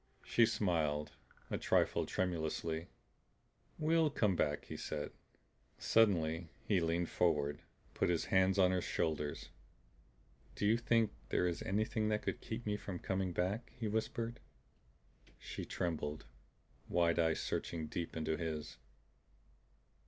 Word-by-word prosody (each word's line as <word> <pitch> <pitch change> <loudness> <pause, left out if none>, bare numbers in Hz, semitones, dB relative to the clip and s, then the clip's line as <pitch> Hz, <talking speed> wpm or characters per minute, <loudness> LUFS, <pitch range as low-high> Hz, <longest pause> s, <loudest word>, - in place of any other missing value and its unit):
She 115 -1 +5
smiled, 80 -9 0 0.4
a - - -1
trifle - - +2
tremulously. 80 -2 -1 0.9
"We'll 160 0 +3
come 105 -9 +2
back," 75 -3 0
he - - -7
said. 75 -1 -4 0.7
Suddenly 85 -7 +3 0.2
he 100 -3 +3
leaned 85 +1 0
forward, 75 -4 +1 0.3
put - - +1
his 85 -2 +1
hands 95 0 +3
on 95 -1 +5
her 90 -1 +1
shoulders. 75 -4 -1 1.1
"Do - - -1
you 110 +2 +5
think 115 -2 +3 0.2
there - - +2
is 85 - -2
anything 110 +2 0
that 105 0 0
could - - -2
keep 115 +2 -5
me 105 -1 0
from 100 -3 -5
coming 95 0 -1
back?" 95 +7 -2
he 115 -2 -3
whispered. 115 +2 -2 1.0
She - - -6
trembled, 80 -3 -2 0.6
wide 85 -1 +3
eyes 80 -1 +3
searching 80 -2 -2
deep 85 +2 -4
into 80 0 0
his. 75 -6 -4
90 Hz, 130 wpm, -36 LUFS, 80-105 Hz, 1.1 s, She